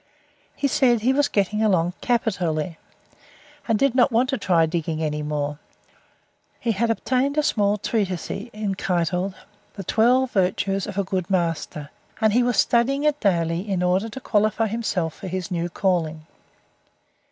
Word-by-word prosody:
He 280 - 0
said 245 -4 +3
he 255 +4 +3
was 285 +1 +3
getting 210 -1 0
along 180 -5 +2
capitally, 180 -9 -1 0.9
and 225 -2 +2
did 275 +2 +2
not 255 +1 +4
want 240 +3 +2
to 270 - 0
try 170 -5 +3
digging 160 -1 -2
any 150 -1 -2
more. 150 -1 -3 1.0
He 235 - 0
had 225 +3 0
obtained 260 +5 0
a 300 - +3
small 205 -5 +2
treatise 195 -4 -2 0.5
called 180 +1 -1 0.4
"The 195 - -6
Twelve 245 +6 +3
Virtues 195 0 0
of 200 -2 -7
a 200 - +2
Good 185 -1 -3
Master," 165 -5 -2 0.3
and 220 -2 +3
he 245 - +4
was 245 -1 +1
studying 265 +4 +2
it 300 -1 +2
daily 170 0 0
in 185 -2 0
order 185 +5 +1
to 230 - -7
qualify 215 -2 +1
himself 200 -7 -2
for - - -9
his 185 0 -4
new 175 0 -1
calling. 165 -4 -1
195 Hz, 155 wpm, -23 LUFS, 175-235 Hz, 1.0 s, not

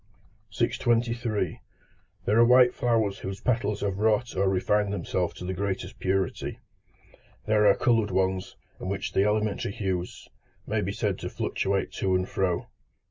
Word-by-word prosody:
623. 115 -3 0 0.6
There 105 +3 +3
are - - +8
white 125 +1 +6
flowers 110 -5 +1
whose 95 +1 -5
petals 115 -4 0
have 100 -1 -2
wrought 110 +3 +1
or 95 +1 +2
refined 100 +2 +1
themselves 95 -3 -2
to 90 - -7
the 95 - -2
greatest 95 +1 -3
purity; 95 -1 -1 0.9
there 105 -1 +4
are 100 - +6
coloured 115 -3 +2
ones, 95 0 -1 0.2
in 95 - -5
which 95 -1 -3
the 95 - +3
elementary 105 -1 0
hues 95 -5 -3 0.4
may - - 0
be - - -2
said - - -1
to - - -4
fluctuate 95 0 -1
to 95 -1 0
and 90 0 0
fro. 90 -3 -1
100 Hz, 150 wpm, -27 LUFS, 95-110 Hz, 0.9 s, are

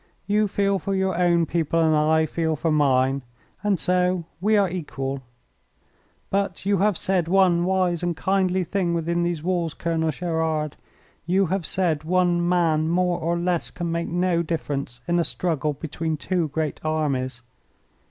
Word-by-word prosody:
"You 210 +2 +2
feel 200 0 +1
for 195 0 -2
your 190 -1 0
own 170 -1 +3
people 165 0 0
and 160 -1 +3
I 155 +1 +3
feel 160 0 -1
for 160 +2 -1
mine, 135 -2 +2 0.4
and 205 -4 +1
so 180 -1 +1
we 210 +4 +3
are 200 -1 +4
equal. 140 -6 -4 1.1
But 195 -2 -1
you 200 -2 +2
have 205 -2 +2
said 185 -3 0
one 180 -2 +3
wise 185 -2 +1
and 175 -2 -2
kindly 190 0 +1
thing 175 0 -1
within 170 +1 0
these 170 -3 -1
walls, 175 -3 -1
Colonel 165 -1 -1
Gerard. 160 -3 -1 0.5
You 190 +2 +3
have 190 -4 -1
said, 165 -5 0
'One 175 0 +2
man 160 -3 +2
more 180 0 +1
or 170 +2 0
less 175 -1 -1
can 170 -1 -4
make 170 0 -1
no 175 0 +1
difference 145 -6 -4
in 175 0 +2
a - - +3
struggle 155 -4 -1
between 160 +2 -3
two 175 +1 -1
great 155 0 -3
armies.' 135 -6 -1
170 Hz, 160 wpm, -24 LUFS, 155-185 Hz, 1.1 s, are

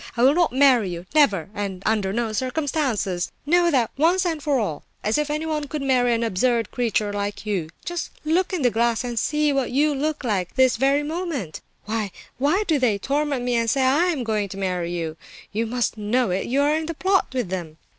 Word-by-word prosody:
I 235 - +2
will 270 +2 +6
not 345 +1 +2
marry 255 -6 +4
you—never, 195 - +1
and 195 -2 -4
under 210 -3 +1
no 225 +1 -1
circumstances! 255 - -1
Know 345 +3 +4
that 255 -8 +1
once 345 +5 +3
and 325 -3 -1
for 285 -2 +1
all; 165 -10 -2 0.2
as 215 +7 +1
if 300 0 -1
anyone 305 -1 -2
could 295 0 -4
marry 250 -2 +3
an 230 - -1
absurd 230 +1 +1
creature 220 -4 0
like 205 +1 -3
you! 190 -7 -2 0.2
Just 345 0 -3 0.2
look 345 +4 +1
in 360 -7 -2
the 245 - +4
glass 235 +1 +1
and 240 -2 -2
see 300 +2 +1
what 270 -2 0
you 295 +3 +2
look 300 +2 -2
like, 195 -7 -1
this 260 -1 +4
very 275 +4 +2
moment! 305 - -4 0.2
Why, 215 -1 -2 0.3
why 305 +10 +2
do 310 -6 +2
they 235 -6 +2
torment 280 +3 -1
me 250 - 0
and 230 -1 +1
say 270 +3 +2
I 275 +7 +3
am 320 -8 0
going 215 -3 -1
to 195 - -8
marry 180 -3 -2
you? 165 -2 -4 0.3
You 225 +2 -1
must 240 -1 -1
know 215 +1 +1
it; 185 +2 -1
you 270 +4 +1
are 295 +1 +3
in 315 0 -2
the 335 - -4
plot 380 +4 +2
with 250 -7 -2
them!" 170 -4 -5
250 Hz, 215 wpm, -23 LUFS, 205-295 Hz, 0.3 s, will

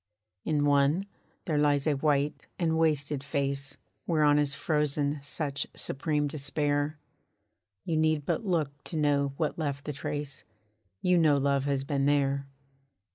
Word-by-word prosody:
In 150 -2 +1
one, 145 +6 +3 0.4
there 155 -4 +1
lies 145 -1 +3
a 155 - +3
white 145 +1 0
and 165 -2 +1
wasted 150 -3 +1
face 140 -1 -2 0.3
Whereon 150 -3 +4
is 145 -1 +1
frozen 150 -1 0
such 145 0 -2
supreme 150 +1 -1
despair, 145 +1 -1 0.9
You 160 - 0
need 155 -2 +2
but - - -1
look 150 -7 -1
to 165 - -4
know 140 -2 +2
what 155 0 -1
left 145 -2 -3
the 150 - -3
trace; 145 0 -4 0.6
You 180 -1 +4
know 155 -3 +5
love 140 0 +1
has 140 -1 0
been 140 -1 0
there. 140 -1 +1
145 Hz, 140 wpm, -29 LUFS, 140-155 Hz, 0.9 s, know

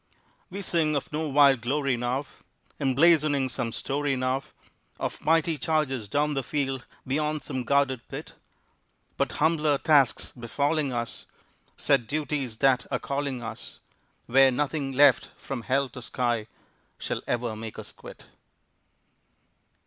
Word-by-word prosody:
We 195 +2 -6
sing 160 -4 +1
of 140 - -3
no 155 0 -1
wild 140 -3 +5
glory 135 +2 0
now, 125 +4 -2 0.5
Emblazoning 145 0 +3
some 115 -1 -3
story 140 +3 -1
now 130 +1 0 0.6
Of - - -4
mighty 160 -1 +2
charges 135 -9 -1
down 150 +5 +1
the 135 - 0
field 135 -2 -2 0.2
beyond 150 +3 -1
some 130 -3 -4
guarded 135 -2 +1
pit; - - -8 0.8
But - - -1
humbler 155 -2 +2
tasks 140 -4 +3
befalling 140 +4 -1
us, 120 -1 -4 0.5
Set 135 -6 +2
duties 145 -5 -2
that 130 0 +3
are - - 0
calling 140 -3 -3
us, 115 -1 -8 0.5
Where 135 +2 +6
nothing 140 +1 -1
left 135 -1 +5
from 135 -3 -5
hell 135 +3 +1
to 125 +2 -10
sky 120 -2 -1 0.5
shall - - -3
ever 120 -2 -1
make 110 0 -7
us - - -7
quit. - - -13
135 Hz, 135 wpm, -27 LUFS, 125-150 Hz, 0.8 s, Where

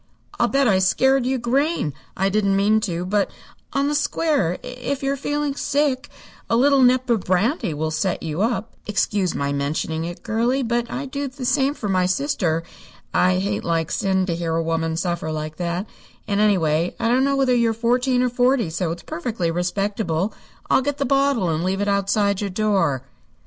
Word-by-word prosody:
"I'll - - +4
bet 275 -1 +2
I 190 -4 +4
scared 265 +7 +3
you 265 0 +1
green. 255 - 0 0.2
I 195 +1 +2
didn't 200 -1 +2
mean 210 +2 +3
to, 175 +1 -3
but, 200 +2 +1 0.4
on 275 +1 +1
the 295 - 0
square, 295 - +1
if 250 +2 -4
you're 275 +1 +1
feeling 290 +1 -2
sick, 285 -1 0 0.4
a - - +3
little 275 +3 +4
nip 255 0 +4
of 230 - +3
brandy 185 - 0
will 155 +1 -2
set 180 +4 -1
you 160 +2 -3
up. 225 -1 -1
Excuse 200 -2 0
my 140 0 -1
mentioning 155 +3 -2
it, 175 0 -7
girlie, 235 +4 0
but 235 0 -1
I'd 265 +1 -5
do 280 0 -2
the 260 -1 -7
same 275 +2 +2
for 215 - -4
my 185 -2 +2
sister. 180 - 0 0.5
I 185 0 +3
hate 200 +2 -1
like 165 -2 -1
sin 190 -1 +1
to 175 - -1
hear 165 -1 -2
a 165 - +1
woman 165 0 -1
suffer 170 -2 -2
like 155 0 -5
that, 175 +2 -2 0.4
and, 200 -1 0
anyway, 170 -5 +2
I - - 0
don't 250 +3 +3
know 275 0 +2
whether 265 -2 +2
you're 235 -2 +3
fourteen 245 +3 +1
or 250 - +2
forty, 245 -5 +2
so 165 +1 -1
it's 170 - -6
perfectly 175 -3 -2
respectable. 190 +1 -1 0.3
I'll - - +4
get 285 +1 -2
the 280 - 0
bottle 275 -7 +2
and 160 +1 -1
leave 190 +1 0
it 205 - 0
outside 200 0 +1
your 205 - -2
door." 190 - +1
205 Hz, 190 wpm, -22 LUFS, 175-255 Hz, 0.5 s, I'll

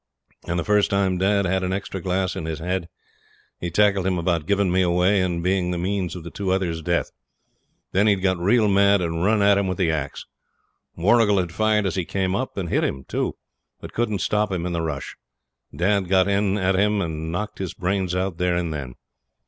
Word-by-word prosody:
And 85 - -1
the 85 - 0
first 105 +1 +2
time 95 -2 +1
dad 100 +1 +2
had 95 +1 0
an 95 0 -2
extra 95 -1 -4
glass 95 0 -1
in 80 - -4
his 80 -1 -3
head 90 +2 -3 0.7
he 85 - -3
tackled 100 +1 +2
him 95 -1 +1
about 85 -2 -1
giving 100 -2 +2
me 95 +1 +3
away 90 +2 +3
and 85 -2 -1
being 90 -1 +1
the 90 - -2
means 95 -1 -2
of 90 - -7
the 85 - -8 0.2
other 95 0 +1
two's 80 -1 -3
death. 85 +2 -1 0.8
Then 100 +3 +3
he'd 100 -3 +2
got 95 -2 +1
real 105 +5 +3
mad 100 0 +4
and 85 -1 -2
run 105 +1 +3
at 100 0 +5
him 100 - 0
with 95 - -2
the 90 -5 +1
axe. 75 -3 -4 0.7
Warrigal 105 +3 +3
had 90 -3 -1
fired 105 +2 +1
as 95 - 0
he 95 - -1
came 95 0 -1
up, 130 -1 -3
and 90 -4 -3
hit - - +1
him 65 - -2
too; - - -2 0.4
but - - -10
couldn't 110 -4 -1
stop 105 0 0
him 90 -2 -2
in 90 - -2
the 85 - -1
rush. 75 -4 -4 0.6
Dad 95 +4 0
got 95 0 +4
in 100 0 +1
at 95 -1 +1
him, 105 +2 +2
and 80 -2 -3
knocked 105 +5 -4
his 95 -3 -4
brains 95 -1 -1
out 90 -2 -2
there 90 -1 +1
and 85 -2 -1
then. 65 -5 -6
95 Hz, 220 wpm, -23 LUFS, 85-100 Hz, 0.8 s, at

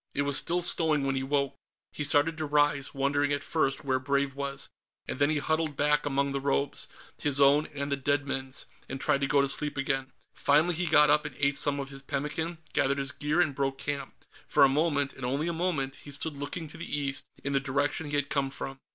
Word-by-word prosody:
It 140 - +1
was 140 -1 -1
still 175 +4 +1
snowing 155 -4 +3
when 135 0 0
he 135 - 0
woke. 140 0 0 0.4
He 150 - -4
started 145 +3 +3
to 155 - -2
rise, 145 -1 +2
wondering, 145 +1 +1
at 145 0 -1
first, 145 -4 0
where 130 -1 +1
Brave 140 +1 0
was, 140 0 -4 0.4
and - - -4
then 145 +1 +4
he 155 - +1
huddled 155 0 -1
back 150 0 +2
among 140 0 0
the 140 0 -2
robes 140 0 0 0.3
his 145 -1 +2
own 140 +2 +5
and 140 -1 -5
the - - +3
dead 145 +1 0
men's 135 0 -3 0.2
and 135 - -5
tried 140 - +2
to 140 - +1
go 140 0 +4
to - - +1
sleep 145 +1 +2
again. 135 -1 -1 0.2
Finally, 155 +5 +3
he 175 +2 -1
got 150 -1 +6
up 150 0 +4
and 150 - -7
ate 140 0 +2
some 140 0 0
of 135 0 -4
his 135 0 -9
pemmican, 150 +5 -3 0.2
gathered 140 +1 +2
his 135 -1 -1
gear 150 +8 0
and 155 -5 +1
broke 135 0 -1
camp. 140 -1 -5 0.2
For - - +4
a - - +8
moment, 145 0 +1
and 130 - -11
only 140 +6 -1
a 170 - -1
moment, 160 -6 -1
he - - -12
stood 145 +2 -2
looking 145 +4 -5
to - - -10
the 170 -3 -3
east, 140 -1 -2 0.2
in 140 - -2
the 135 - +3
direction 145 +3 -1
he 145 - -2
had 145 -1 +1
come 140 -1 0
from. 135 0 -7
140 Hz, 235 wpm, -29 LUFS, 140-150 Hz, 0.4 s, a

